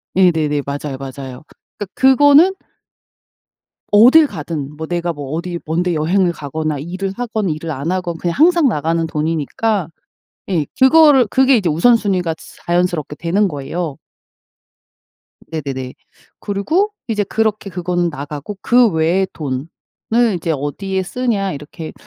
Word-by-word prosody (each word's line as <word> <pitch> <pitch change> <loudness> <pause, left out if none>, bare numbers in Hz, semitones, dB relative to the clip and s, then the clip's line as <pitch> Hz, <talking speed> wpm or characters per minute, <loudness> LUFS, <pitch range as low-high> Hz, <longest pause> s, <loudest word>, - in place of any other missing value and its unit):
네네네. 160 -6 +2
맞아요, 140 -1 -4
맞아요. 135 0 -8 0.3
그러니까 205 - -4
그거는 290 +7 +5 1.4
어딜 255 +9 +7
가든 150 - -6
뭐 160 0 -5
내가 175 0 -2
뭐 145 -3 -8
어디 170 +1 -3
먼 165 +3 0
데 180 -2 0
여행을 175 +3 +1
가거나 155 0 -4
일을 185 +6 -4
하건 220 -5 -2
일을 160 +1 -4
안 145 +5 -3
하건 180 -2 -2
그냥 170 0 -2
항상 335 -2 +5
나가는 165 -2 0
돈이니까 165 +5 -1 0.6
예 165 -6 0
그거를 270 -3 +6
그게 265 +2 +4
이제 185 -6 0
우선순위가 185 -2 +2
츠 - - -15
자연스럽게 175 -4 0
되는 195 +5 +1
거예요. 150 0 -4 1.5
네네네. 135 -5 -5 0.4
그리고 315 - -1 0.2
이제 210 -2 0
그렇게 215 -1 -1
그거는 175 -1 -1
나가고 150 +6 -7
'그 245 -1 +4
외의 170 +3 +1
돈을 135 -2 -4 0.7
이제 165 -1 -2
어디에 190 +7 -3
쓰냐.' 205 -2 -1
이렇게 150 +2 -8
175 Hz, 300 characters per minute, -17 LUFS, 150-210 Hz, 1.5 s, 어딜